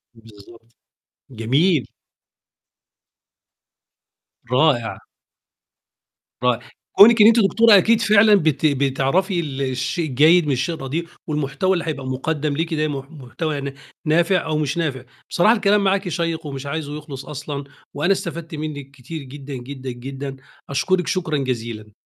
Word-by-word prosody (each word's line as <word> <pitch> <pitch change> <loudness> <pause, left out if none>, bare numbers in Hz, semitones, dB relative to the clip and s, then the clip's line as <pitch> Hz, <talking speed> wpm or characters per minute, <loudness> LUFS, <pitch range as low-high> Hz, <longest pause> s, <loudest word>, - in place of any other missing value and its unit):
بالضبط، 115 +1 -17 0.6
جميل. 130 - +1 2.7
رائع. 125 -4 +2 1.4
رائع. 125 -1 +2 0.4
كونِك 225 +2 +8
إن 210 - +9
أنتِ 230 +1 +5
دكتورة 220 +2 +6
أكيد 225 +4 +3
فعلًا 215 -1 +5
بت 155 -4 +1
بتعرفي 140 +7 +1
ال 140 -5 -4
الشيء 135 +5 -2
الجيد 155 +6 +5
من - - +1
الشيء 135 +7 -1
الردئ، 155 +3 -4 0.2
والمحتوى 150 +5 0
اللي 175 -2 -2
هيبقى 140 -4 -4
مُقدَم 145 +3 -2
ليكِ 165 0 -2
ده 155 0 0
مح 140 0 -6
محتوى 155 +2 -5
يعني 140 -1 -4 0.3
نافع 170 +4 +2
أو 155 -1 -1
مش 150 +1 -1
نافع. 140 -7 -2 0.3
بصراحة 195 +6 +4
الكلام 205 -1 +2
معاكِ 195 -1 +1
شيق 165 -1 -2
ومش 140 -1 -6
عايزُه 150 0 -4
يخلص 145 -3 -9
أصلًا 145 -1 -6 0.3
وأنا 155 +7 0
استفدت 170 -4 -3
منِك 145 -3 -6
كتير 140 +3 -8
جدًا، 140 +1 -9
جدًا، 130 +1 -7
جدًا. 135 +2 -7 0.3
أشكرِك 180 +6 0
شكرًا 165 -5 -1
جزيلًا. 115 -5 -4
150 Hz, 135 wpm, -21 LUFS, 135-170 Hz, 2.7 s, إن